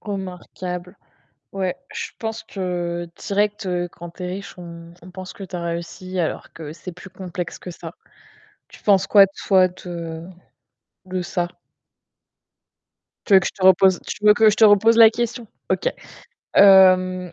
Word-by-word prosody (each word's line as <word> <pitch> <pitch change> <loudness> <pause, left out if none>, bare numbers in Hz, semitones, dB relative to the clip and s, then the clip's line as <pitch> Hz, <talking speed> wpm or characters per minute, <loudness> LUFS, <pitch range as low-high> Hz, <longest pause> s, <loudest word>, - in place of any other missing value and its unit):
Remarquable. 180 -2 -7 0.6
Ouais, 190 -2 -2 0.2
je - - -5
pense 225 -1 -5
que 175 -2 -4
direct, 205 +1 -1
heu, 175 -1 -2
quand 175 0 -11
tu 180 - -12
es - - -3
riche, 190 +1 -8
on 170 -1 -11
on 180 - -12
pense 185 0 -9
que 195 - -10
tu 180 - -7
as 175 - -5
réussi, 170 +2 -5
alors 160 - -4
que 155 -2 -9
c'est 170 +3 -9
plus 180 +2 -13
complexe 180 -1 -7
que 180 - -9
ça. 165 -1 -10 0.7
Tu - - -17
penses 195 -3 +3
quoi 200 -2 +7 0.2
toi, 190 -2 +5
de 170 -2 -8 0.8
de 185 0 -4
ça? 175 0 -2 1.8
Tu 205 - +3
veux 190 - +8
que 175 - -4
je - - -3
te 190 - -11
repose 190 0 +5
tu 210 - -7
veux 210 - +7
que 215 +1 +5
je 210 - -2
te 225 - +5
repose 215 +2 +5
la 225 -1 +8
question? 240 0 -4 0.2
OK. - - +1 0.7
Hem, 185 -2 +5
185 Hz, 165 wpm, -21 LUFS, 175-200 Hz, 1.8 s, veux